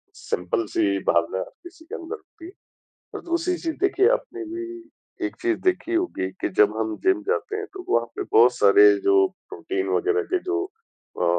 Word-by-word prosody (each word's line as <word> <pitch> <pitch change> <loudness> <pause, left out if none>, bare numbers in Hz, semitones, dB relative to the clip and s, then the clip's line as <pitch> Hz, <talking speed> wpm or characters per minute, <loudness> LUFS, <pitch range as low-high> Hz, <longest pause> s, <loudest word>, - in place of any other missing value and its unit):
simple 90 +6 -2
सी 100 -1 +1
भावना 85 +2 +2 0.2
किसी 350 -2 -14
के - - -7
अंदर 335 +5 -6
होती 370 -5 -16
है, 350 - -9 0.6
और - - -6
दूसरी 340 +1 0
चीज़ 325 -2 -4
देखिए 390 +1 +3
आपने 435 -7 -3
भी 340 +1 -5 0.6
एक - - -8
चीज़ 355 -2 +1
देखी 365 -2 0
होगी 340 - -1
कि - - 0
जब 105 +1 +5
हम 110 -1 -1
जिम 375 -4 +3
जाते 430 -2 -1
हैं 425 0 -4
तो 375 -2 -8
वहाँ 375 - +2
पे 410 - -2
बहुत 435 +1 +6
सारे 415 -1 +7
जो 390 0 +5 0.2
प्रोटीन 380 0 -3
वग़ैरह 420 +1 +1
के - - +4
जो 375 0 -1
अ, 445 +4 -9
365 Hz, 185 wpm, -24 LUFS, 330-395 Hz, 0.6 s, सारे